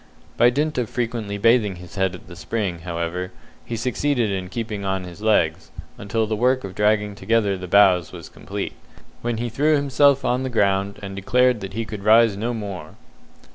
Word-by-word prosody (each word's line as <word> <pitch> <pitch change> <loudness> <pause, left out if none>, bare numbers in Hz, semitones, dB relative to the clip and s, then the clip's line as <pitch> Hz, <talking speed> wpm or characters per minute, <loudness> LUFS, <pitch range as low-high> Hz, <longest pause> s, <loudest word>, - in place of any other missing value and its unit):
By 120 +1 +5
dint 150 +2 -1
of 120 -3 -2
frequently 115 -4 -3
bathing 110 -2 +3
his 90 +1 -12
head 95 -2 0
at - - -13
the 85 - -11
spring, 95 -4 -3
however, 85 +1 -4 0.3
he 120 - -5
succeeded 125 -1 0
in 95 -2 -3
keeping 105 -1 -4
on 95 -1 -1
his 90 +2 -10
legs, 95 -8 +1 0.3
until 110 +2 -1
the 110 0 -2
work 130 +4 +2
of 95 -1 -6
dragging 105 0 +1
together 105 -1 +1
the 90 -1 -7
boughs 90 -2 +4
was 85 -3 -9
completed, - - -6 0.5
when 120 -1 -2
he 120 +2 -2
threw 145 +7 +2
himself 140 -1 +3
on 125 +1 +1
the 130 - -2
ground, 100 -3 +1
and 95 0 -6
declared 125 +5 +2
that 95 -1 -7
he 115 +2 -3
could 105 -2 -7
rise 110 0 +5
no 115 +4 -2
more. 100 -8 -6
105 Hz, 190 wpm, -22 LUFS, 95-120 Hz, 0.5 s, By